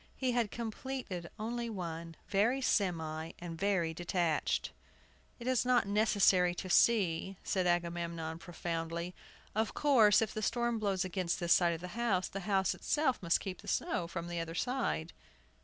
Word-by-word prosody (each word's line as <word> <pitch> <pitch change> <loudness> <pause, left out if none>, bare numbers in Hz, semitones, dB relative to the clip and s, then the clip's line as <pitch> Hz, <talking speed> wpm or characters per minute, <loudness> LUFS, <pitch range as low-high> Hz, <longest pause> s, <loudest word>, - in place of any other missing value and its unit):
He 260 -2 0
had 235 -3 +1
completed 230 -6 -5
only 235 +2 -3
one, 170 -5 -5
very 220 +7 +2
semi 165 -9 0
and 170 -1 -6
very 175 -3 +1
detached. 170 -1 0 0.7
"It 240 - -9
is 255 -1 +2
not 250 -4 +3
necessary 200 -4 +4
to 185 +1 -5
see," 190 -3 +3
said 185 -2 0
Agamemnon, 170 -2 -1
profoundly; 170 0 -4 0.4
"of 220 +1 -1
course, 235 -8 +5
if 220 -2 -1
the 215 - -3
storm 235 +1 0
blows 195 -3 0
against 185 -2 -1
this 170 -2 +4
side 170 -2 +3
of 165 - -9
the 180 - -6
house, 205 -3 0
the 195 - -5
house 190 -2 +2
itself 295 -4 0
must 170 -2 +2
keep 190 -3 -6
the - - -14
snow 170 - -1
from 170 0 -5
the 175 -1 -3
other 165 0 -4
side." 245 -7 -1
185 Hz, 160 wpm, -33 LUFS, 170-225 Hz, 0.7 s, course